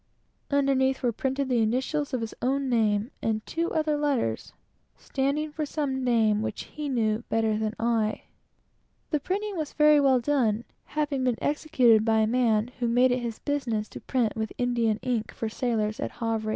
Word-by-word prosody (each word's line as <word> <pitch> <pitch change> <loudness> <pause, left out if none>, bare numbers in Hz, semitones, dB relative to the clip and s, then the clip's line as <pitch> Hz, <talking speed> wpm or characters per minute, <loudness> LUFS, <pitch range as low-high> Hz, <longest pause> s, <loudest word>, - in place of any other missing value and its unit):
Underneath 270 -2 +2
were 245 - +2
printed 265 +4 -2
the 245 -3 +2
initials 260 +6 0
of 255 -3 -1
his 225 - -4
own 270 +2 0
name, 220 0 +1
and 220 -1 -1
two 335 +1 -2
other 310 -1 +1
letters, 275 - -1 0.5
standing 280 +3 -1
for 305 +1 -3
some 280 -3 -2
name 220 -4 +3
which 215 - -4
he 300 -1 -6
knew 225 -3 0
better 225 -1 +1
than 215 0 -2
I 225 -2 0 0.9
did. 300 -3 +1
This 400 +5 -2
was 310 -4 -4
very 300 -1 +5
well 270 -3 +4
done, 235 -5 +1 0.2
having 290 -3 -1
been 250 -3 +1
executed 255 -7 +3
by 220 -1 +3
a - - +4
man 225 -1 +2
who 240 - 0
made 245 +2 +4
it 250 - +1
his 235 -2 -4
business 240 -7 -2
to - - -9
print 240 -5 0
with 220 -1 -3
India 235 -3 +1
ink, 240 -4 -1
for 225 - -4
sailors, 220 -2 -1
at - - -3
Havre. 225 -2 -2
245 Hz, 180 wpm, -27 LUFS, 220-280 Hz, 0.9 s, very